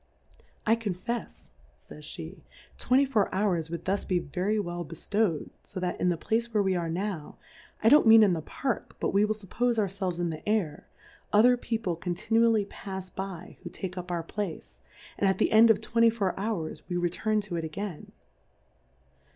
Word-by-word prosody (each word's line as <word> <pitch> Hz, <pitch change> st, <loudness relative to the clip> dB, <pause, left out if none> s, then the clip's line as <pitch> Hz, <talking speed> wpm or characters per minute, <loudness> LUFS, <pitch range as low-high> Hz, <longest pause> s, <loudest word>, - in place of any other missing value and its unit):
I 220 Hz, -, +4 dB
confefs, 230 Hz, +2 st, -5 dB, 0.3 s
[ays -, -, -19 dB, 0.3 s
^ej -, -, -8 dB, 0.4 s
twenty 260 Hz, +3 st, +4 dB
four 225 Hz, -7 st, +1 dB
Houi^s 185 Hz, -5 st, 0 dB
would 170 Hz, 0 st, -5 dB
thus 195 Hz, +2 st, 0 dB
be 185 Hz, -, 0 dB
very 185 Hz, +7 st, -1 dB
well 175 Hz, -3 st, -3 dB
bcliowM, 165 Hz, +2 st, -1 dB
fo 190 Hz, -, -7 dB
that 180 Hz, -1 st, -3 dB
in 180 Hz, -, +3 dB
the 175 Hz, -, 0 dB
Place 230 Hz, +7 st, -1 dB
where 210 Hz, -2 st, +2 dB
we 190 Hz, -1 st, +1 dB
are 170 Hz, -2 st, -1 dB
now, 180 Hz, -2 st, -4 dB, 0.5 s
I 225 Hz, -, +7 dB
don'^t 295 Hz, -4 st, +7 dB
mean 225 Hz, 0 st, +9 dB
in 195 Hz, -4 st, +4 dB
the 165 Hz, -, -2 dB
Park, 240 Hz, -, -3 dB
but -, -, 0 dB
we 200 Hz, +1 st, +4 dB
will 215 Hz, 0 st, 0 dB
fuppofe 230 Hz, +4 st, -1 dB
our 215 Hz, -, +3 dB
felves 190 Hz, -2 st, -3 dB
in 175 Hz, -1 st, 0 dB
the 155 Hz, -, -6 dB
Air, 180 Hz, -9 st, -1 dB, 0.4 s
other 240 Hz, +4 st, +6 dB
People 225 Hz, -7 st, -2 dB
con 175 Hz, +1 st, -3 dB
tinually 225 Hz, +1 st, +2 dB
pafs 190 Hz, -2 st, -7 dB
by 190 Hz, -2 st, -6 dB
who -, -, -7 dB
take 190 Hz, -1 st, -6 dB
up 180 Hz, -1 st, -6 dB
our 170 Hz, -2 st, -2 dB
Place, 165 Hz, -, -6 dB, 0.4 s
and 195 Hz, -, +3 dB
at 190 Hz, -, +1 dB
the -, -, +2 dB
End 225 Hz, +1 st, +7 dB
of 225 Hz, -, +4 dB
twenty 230 Hz, 0 st, +4 dB
four 210 Hz, -5 st, -1 dB
Hours 195 Hz, -6 st, -3 dB
we 175 Hz, -, -1 dB
return 180 Hz, +5 st, 0 dB
to 195 Hz, -4 st, -5 dB
it 165 Hz, -, -2 dB
again. 165 Hz, +2 st, -6 dB
195 Hz, 190 wpm, -28 LUFS, 175-220 Hz, 0.5 s, mean